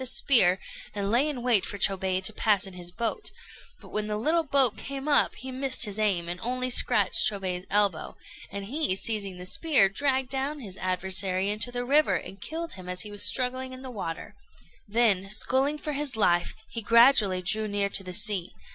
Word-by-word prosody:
a -, -, -4 dB
spear, 220 Hz, -8 st, +5 dB, 0.4 s
and 200 Hz, 0 st, -2 dB
lay 260 Hz, +6 st, +2 dB
in 255 Hz, -5 st, -5 dB
wait 235 Hz, -6 st, +3 dB
for 205 Hz, -, -5 dB
Chôbei 190 Hz, -1 st, 0 dB
to 220 Hz, -, -5 dB
pass 205 Hz, -2 st, +1 dB
in 195 Hz, -, -9 dB
his 175 Hz, -1 st, -5 dB
boat; 230 Hz, -, -3 dB, 0.5 s
but -, -, -15 dB
when 210 Hz, 0 st, -3 dB
the 210 Hz, 0 st, -3 dB
little 315 Hz, +10 st, +1 dB
boat 275 Hz, -6 st, +2 dB
came 275 Hz, +1 st, -7 dB
up, 295 Hz, -, +3 dB
he 260 Hz, 0 st, -7 dB
missed 260 Hz, -1 st, +3 dB
his 205 Hz, 0 st, -4 dB
aim, 190 Hz, -6 st, 0 dB
and 175 Hz, +1 st, -5 dB
only 255 Hz, +2 st, -2 dB
scratched 210 Hz, -3 st, +3 dB
Chôbei's 185 Hz, -3 st, -4 dB
elbow; 200 Hz, -5 st, 0 dB, 0.3 s
and 200 Hz, 0 st, -6 dB
he, 270 Hz, -3 st, 0 dB
seizing 200 Hz, -2 st, -1 dB
the 180 Hz, -, -8 dB
spear, 260 Hz, -, +3 dB
dragged 265 Hz, +3 st, -1 dB
down 275 Hz, +3 st, -3 dB
his 200 Hz, -8 st, -8 dB
adversary 185 Hz, +1 st, -1 dB
into 215 Hz, +4 st, 0 dB
the 245 Hz, 0 st, -4 dB
river, 295 Hz, +4 st, +3 dB
and 195 Hz, -, -7 dB
killed 330 Hz, +1 st, -5 dB
him 185 Hz, -2 st, -9 dB
as 180 Hz, 0 st, +1 dB
he 210 Hz, -, -5 dB
was 205 Hz, 0 st, -3 dB
struggling 255 Hz, 0 st, 0 dB
in 255 Hz, +1 st, -11 dB
the 260 Hz, -, -8 dB
water; 165 Hz, -8 st, -7 dB, 0.5 s
then, 205 Hz, -3 st, +1 dB
sculling 265 Hz, +7 st, 0 dB
for 300 Hz, 0 st, -5 dB
his 285 Hz, -3 st, -1 dB
life, 175 Hz, -5 st, +1 dB
he 230 Hz, -, -5 dB
gradually 220 Hz, -4 st, +4 dB
drew 215 Hz, +4 st, -1 dB
near 205 Hz, -1 st, -1 dB
to 195 Hz, -, 0 dB
the 185 Hz, -, -8 dB
sea. 200 Hz, -2 st, +1 dB
215 Hz, 200 wpm, -26 LUFS, 190-260 Hz, 0.5 s, spear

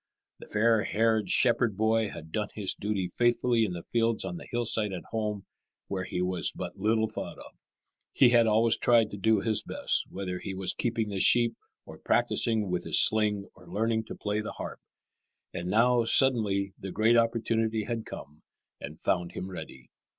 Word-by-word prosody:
The -, -, -12 dB
fair 110 Hz, +1 st, +2 dB
haired 110 Hz, -3 st, +1 dB
shepherd 120 Hz, -4 st, +2 dB
boy 110 Hz, 0 st, +1 dB
had 80 Hz, -3 st, -10 dB
done 105 Hz, +1 st, -2 dB
his 100 Hz, -3 st, -1 dB
duty 100 Hz, -3 st, -2 dB
faithfully 120 Hz, +3 st, +1 dB
in 95 Hz, -, -4 dB
the 85 Hz, -1 st, -7 dB
fields 115 Hz, -1 st, 0 dB
on 175 Hz, -, -5 dB
the -, -, -11 dB
hillside 115 Hz, -3 st, 0 dB
at 90 Hz, -, -6 dB
home, 105 Hz, -3 st, -3 dB, 0.4 s
where 95 Hz, -2 st, -3 dB
he 90 Hz, -, -3 dB
was 90 Hz, -1 st, -1 dB
but -, -, -7 dB
little 110 Hz, +2 st, +1 dB
thought -, -, -6 dB
of. -, -, -12 dB, 0.6 s
He 125 Hz, -, +5 dB
had 120 Hz, -1 st, +4 dB
always 115 Hz, +1 st, +3 dB
tried 115 Hz, -3 st, +3 dB
to 100 Hz, -, -6 dB
do 110 Hz, +1 st, +2 dB
his 110 Hz, 0 st, +1 dB
best, -, -, -1 dB
whether 90 Hz, -2 st, -5 dB
he 95 Hz, -, -6 dB
was 95 Hz, -1 st, -1 dB
keeping 115 Hz, -2 st, -2 dB
the 100 Hz, -2 st, -3 dB
sheep 120 Hz, +3 st, +5 dB, 0.3 s
or -, -, -12 dB
practising 110 Hz, -3 st, +1 dB
with 90 Hz, -1 st, -1 dB
his -, -, +3 dB
sling 105 Hz, -2 st, +3 dB
or -, -, -18 dB
learning 110 Hz, +1 st, -1 dB
to -, -, -8 dB
play 105 Hz, +1 st, -2 dB
the 105 Hz, -, -6 dB
harp. -, -, -7 dB, 0.7 s
And 90 Hz, +1 st, -4 dB
now, 120 Hz, +3 st, +3 dB
suddenly, 105 Hz, -7 st, +2 dB
the 95 Hz, -, -6 dB
great 110 Hz, +5 st, +3 dB
opportunity 115 Hz, -1 st, +1 dB
had 115 Hz, +1 st, -4 dB
come 75 Hz, -6 st, -10 dB, 0.4 s
and 75 Hz, +2 st, -9 dB
found 90 Hz, -2 st, -1 dB
him 95 Hz, -, -6 dB
ready. 65 Hz, -8 st, -10 dB
110 Hz, 185 wpm, -28 LUFS, 95-115 Hz, 0.7 s, He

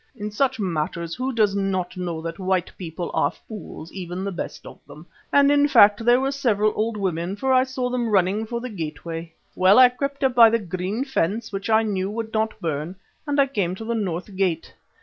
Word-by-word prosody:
In 210 Hz, -2 st, -5 dB
such 260 Hz, +3 st, 0 dB
matters 170 Hz, -2 st, -2 dB
who 260 Hz, +6 st, -2 dB
does 215 Hz, -5 st, +2 dB
not 185 Hz, -3 st, -1 dB
know 175 Hz, -3 st, -4 dB
that 165 Hz, +1 st, -5 dB
white 185 Hz, -1 st, -1 dB
people 170 Hz, -1 st, -6 dB
are -, -, +2 dB
fools, 205 Hz, -6 st, -10 dB
even 180 Hz, 0 st, -5 dB
the 200 Hz, -, -3 dB
best 175 Hz, -, -6 dB
of -, -, -11 dB
them, 150 Hz, +3 st, -13 dB, 0.3 s
and 280 Hz, 0 st, +5 dB
in 290 Hz, 0 st, +4 dB
fact 205 Hz, -5 st, +6 dB
there 240 Hz, +2 st, +5 dB
were 270 Hz, +1 st, 0 dB
several 215 Hz, -6 st, +1 dB
old 220 Hz, 0 st, -1 dB
women, 180 Hz, -1 st, -2 dB
for 265 Hz, +5 st, 0 dB
I 255 Hz, 0 st, +5 dB
saw 260 Hz, -1 st, -3 dB
them 245 Hz, -2 st, -1 dB
running 200 Hz, +2 st, +1 dB
for 235 Hz, +1 st, -3 dB
the 250 Hz, +1 st, -6 dB
gateway. 165 Hz, -1 st, -6 dB, 0.2 s
Well, 185 Hz, +2 st, +5 dB
I 255 Hz, -1 st, +9 dB
crept 275 Hz, +2 st, -4 dB
up 265 Hz, -1 st, +3 dB
by 235 Hz, -2 st, +8 dB
the 230 Hz, -, +2 dB
green 190 Hz, +4 st, -3 dB
fence 225 Hz, -, -1 dB
which 195 Hz, +2 st, -4 dB
I 220 Hz, 0 st, +4 dB
knew 195 Hz, -3 st, -1 dB
would 220 Hz, +1 st, -5 dB
not 220 Hz, 0 st, -1 dB
burn 160 Hz, 0 st, -3 dB, 0.3 s
and 290 Hz, 0 st, 0 dB
I 280 Hz, -, +6 dB
came 200 Hz, -10 st, -2 dB
to 220 Hz, -, -8 dB
the 235 Hz, -, -1 dB
north 190 Hz, -3 st, -3 dB
gate. 180 Hz, -4 st, -1 dB
205 Hz, 215 wpm, -23 LUFS, 180-235 Hz, 0.3 s, I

